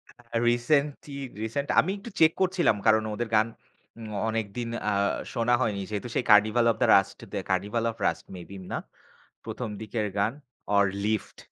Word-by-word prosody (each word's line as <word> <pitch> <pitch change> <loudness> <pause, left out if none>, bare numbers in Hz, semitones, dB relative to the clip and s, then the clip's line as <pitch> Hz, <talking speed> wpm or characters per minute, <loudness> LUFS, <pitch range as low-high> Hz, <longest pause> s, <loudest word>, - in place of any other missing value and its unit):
আ 120 - -20 0.3
recently, 140 +4 0 0.3
recent 130 +6 -2
আমি 185 - -2
একটু 200 +4 -9
check 160 0 +7
করছিলাম, 185 - +3
কারণ 110 0 +5
ওদের 120 +1 -3
গান 110 +1 +4 0.5
উম 110 - -7 0.2
অনেকদিন 115 +1 -3 0.2
আ - - +1 0.4
শোনা 120 +1 +1
হয়নি। 105 -5 0
যেহেতু 105 +3 -3
সেই - - 0
carnival 110 +3 +5
of - - -4
the - - +4
rushed, 95 - -1 0.3
carnival 100 +5 0
of 115 - -14
rust - - -2
maybe 95 +2 -9
না। - - -1 0.7
১ম 125 -3 -4
দিকের 110 -1 -2
গান 105 +4 +1 0.4
ওর 100 0 +5 0.2
লিফট। 110 -1 -2
115 Hz, 160 wpm, -27 LUFS, 105-125 Hz, 0.7 s, check